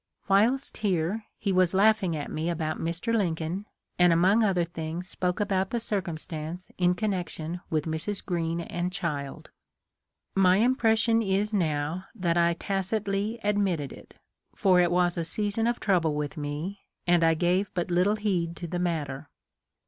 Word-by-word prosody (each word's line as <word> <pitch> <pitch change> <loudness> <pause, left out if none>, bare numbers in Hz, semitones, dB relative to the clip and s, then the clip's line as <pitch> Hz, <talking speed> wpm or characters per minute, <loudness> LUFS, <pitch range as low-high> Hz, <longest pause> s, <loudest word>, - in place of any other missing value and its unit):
Whilst 230 +8 +2
here, 200 +1 0
he 200 - -1
was 185 -1 +3
laughing 200 -4 +3
at 145 -2 -5
me 160 +2 -2
about 160 -2 -2
Mr. 175 +8 -1
Lincoln, 175 0 -1 0.3
and 180 -1 +6
among 190 +7 +4
other 185 -4 +2
things 165 +1 -5
spoke 180 -1 -2
about 195 -2 0
the 235 - -1
circumstance 170 -4 -4
in 180 0 +3
connection 180 -4 -3
with 155 -2 0
Mrs. 160 +6 -3
Greene 170 -2 -1
and 175 +1 -3
child. 150 -7 -4 0.8
My 185 -1 +5
impression 230 -1 +3
is 205 +1 0
now 160 -1 -1
that 175 -5 0
I 170 0 +3
tacitly 200 +4 -2
admitted 195 -9 0
it, - - -15 0.4
for 185 -2 +4
it 175 - +3
was 175 0 +2
a 170 - 0
season 205 +6 -1
of 240 0 0
trouble 170 -7 +2
with 150 -1 -3
me, 150 +7 -4 0.3
and 175 -1 +4
I 165 0 +4
gave 180 +4 +1
but 175 0 -1
little 180 +4 +3
heed 180 -6 -1
to 175 - -6
the 175 +2 -3
matter. 155 -5 -2
180 Hz, 155 wpm, -27 LUFS, 165-200 Hz, 0.8 s, and